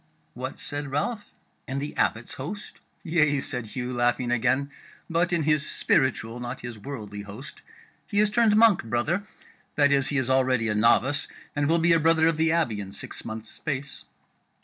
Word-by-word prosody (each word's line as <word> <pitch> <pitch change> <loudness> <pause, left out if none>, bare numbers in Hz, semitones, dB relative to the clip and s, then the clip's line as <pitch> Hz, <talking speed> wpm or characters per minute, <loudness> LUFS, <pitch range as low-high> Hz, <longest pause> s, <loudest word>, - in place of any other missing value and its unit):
"What," - - -6
said 145 0 -4
Ralph, 205 - -2 0.4
"in 135 - -3
the 145 +2 -4
Abbot's 115 +2 0
host?" 190 +11 -7 0.2
"Yea," 155 -5 +2
said 125 -4 -4
Hugh, 125 +3 -4
laughing 120 0 +1
again, 130 +4 +1 0.4
"but 170 +1 +1
in 170 -3 +1
his 150 0 +2
spiritual, 120 -5 +1
not 120 +1 -5
his 120 -2 -7
worldly 105 -5 -7
host: 105 +8 -10 0.5
he 205 - 0
is 210 0 +3
turned 220 -1 +4
monk, 220 -3 +5
brother; 120 - 0 0.5
that 145 -1 +4
is, 140 -1 +3
he 145 - -1
is 130 -3 0
already 130 -3 +2
a - - +1
novice, 120 +6 +3 0.3
and 145 -1 +1
will 165 - +4
be 170 0 +4
a 165 - +4
brother 160 0 +4
of 165 -2 +1
the 160 0 +3
Abbey 145 -11 +1
in 100 -1 -7
six - - -9
months' 110 0 -6
space." 140 -2 -5
140 Hz, 180 wpm, -26 LUFS, 120-165 Hz, 0.5 s, monk